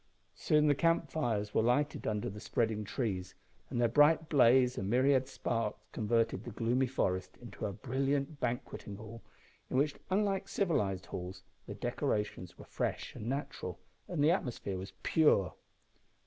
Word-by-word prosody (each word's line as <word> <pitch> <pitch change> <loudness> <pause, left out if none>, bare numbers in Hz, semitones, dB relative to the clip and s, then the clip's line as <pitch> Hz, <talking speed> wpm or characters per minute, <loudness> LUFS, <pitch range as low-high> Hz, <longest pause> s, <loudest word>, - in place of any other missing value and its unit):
Soon 150 0 +2
the 145 - +5
camp 165 0 +1
fires 110 -9 -1
were - - +3
lighted 135 +6 +1
under 105 -1 -1
the 105 +2 -6
spreading 110 -1 -1
trees, 95 -5 -3 0.3
and 120 - -2
their 120 - +4
bright 150 +6 +4
blaze 125 -2 +5
and 95 - -3
myriad 130 +2 +3
sparks 115 -5 -2
converted 115 +1 0
the - - -6
gloomy 120 +4 +1
forest 95 -7 -1
into 115 -3 -6
a - - -3
brilliant 135 +7 -1
banqueting 120 -4 -3
hall, 110 +3 -10 0.5
in - - 0
which, 145 +2 +2 0.2
unlike 195 0 +1
civilised 105 - 0
halls, 90 +1 -7 0.2
the - - -6
decorations 105 -4 -2
were - - -11
fresh - - -3
and 110 - -6
natural, 130 - -4 0.3
and 160 -5 0
the 155 - +6
atmosphere 120 - -2
was 95 - -7
pure. 150 - +3
120 Hz, 155 wpm, -33 LUFS, 105-145 Hz, 0.5 s, the